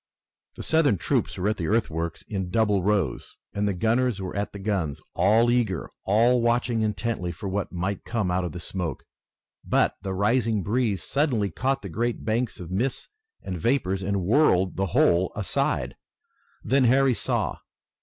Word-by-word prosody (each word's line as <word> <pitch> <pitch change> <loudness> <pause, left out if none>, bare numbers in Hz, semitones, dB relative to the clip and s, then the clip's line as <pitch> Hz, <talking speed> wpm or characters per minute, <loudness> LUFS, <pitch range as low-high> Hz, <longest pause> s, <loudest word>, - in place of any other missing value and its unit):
The - - -7
Southern 160 -9 +3
troops 85 - -1
were 95 - -1
at 105 - -1
the 85 - -2
earthworks 85 -7 -1
in 95 -4 -4
double 105 -1 +2
rows, 100 -2 -1 0.2
and 105 0 0
the 100 - +1
gunners 115 +3 +1
were 95 -1 -5
at 100 0 -2
the - - -8
guns, 95 -8 -2
all 110 +6 +4
eager, 110 -9 0
all 115 +5 +4
watching 120 0 +1
intently 105 -4 -2
for 85 +4 -7
what 95 +1 -2
might 95 +3 -3
come 110 -6 -1
out 90 +1 0
of 90 - -3
the 90 - -7
smoke. 90 -2 -4 0.6
But - - +2
the 95 -1 -4
rising 110 +1 +1
breeze 110 -2 0
suddenly 125 - 0
caught 135 +9 -1
the - - -5
great 120 +7 -2
bank 115 +2 -1
of 90 -1 -8
mists 120 +8 -2 0.3
and 90 -3 -5
vapors 95 - +1
and 100 -1 -1
whirled 95 - +3
the 95 0 0
whole 85 +2 +3
aside. - - -1 0.7
Then 135 +2 +3
Harry 130 +2 +4
saw. - - -1
105 Hz, 170 wpm, -25 LUFS, 95-120 Hz, 0.7 s, all